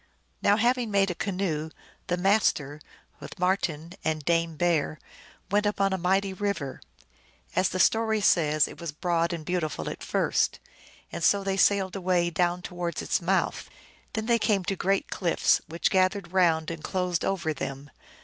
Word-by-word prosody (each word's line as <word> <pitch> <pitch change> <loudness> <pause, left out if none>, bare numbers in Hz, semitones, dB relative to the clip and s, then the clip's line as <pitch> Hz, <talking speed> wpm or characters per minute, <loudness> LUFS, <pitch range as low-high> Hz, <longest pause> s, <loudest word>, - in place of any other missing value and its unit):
Now 205 +1 +4
having 240 0 +1
made 195 -2 +2
a - - -2
canoe, 175 -5 -2 0.4
the 175 - 0
Master, 180 -7 +1 0.4
with - - -10
Marten 175 -3 -1
and 155 -2 -2
Dame 165 -1 +1
Bear, 160 -2 +1 0.5
went 205 +1 +2
upon 195 -1 +1
a - - 0
mighty 190 +2 +1
river. 190 -9 -3 0.7
As 185 0 +3
the 185 - -3
story 220 +3 +3
says, 155 -7 +3
it - - -11
was 170 -2 -4
broad 170 +2 0
and 165 -3 -5
beautiful 175 -3 -2
at - - -9
first, - - 0 0.5
and - - -5
so 200 -1 +4
they 195 0 -1
sailed 195 -1 +2
away 180 -2 +1
down 175 +1 0
towards 175 -2 -4
its - - 0
mouth. - - 0 0.4
Then 220 0 -2
they 235 0 +3
came 205 -3 +1
to 195 - -2
great 195 +1 0
cliffs, 175 -3 +2
which 165 +2 -1
gathered 190 0 +1
round 165 -4 +2
and 165 -2 -7
closed 180 -2 -1
over 170 -5 -1
them. 140 0 -6
180 Hz, 165 wpm, -27 LUFS, 165-195 Hz, 0.7 s, Now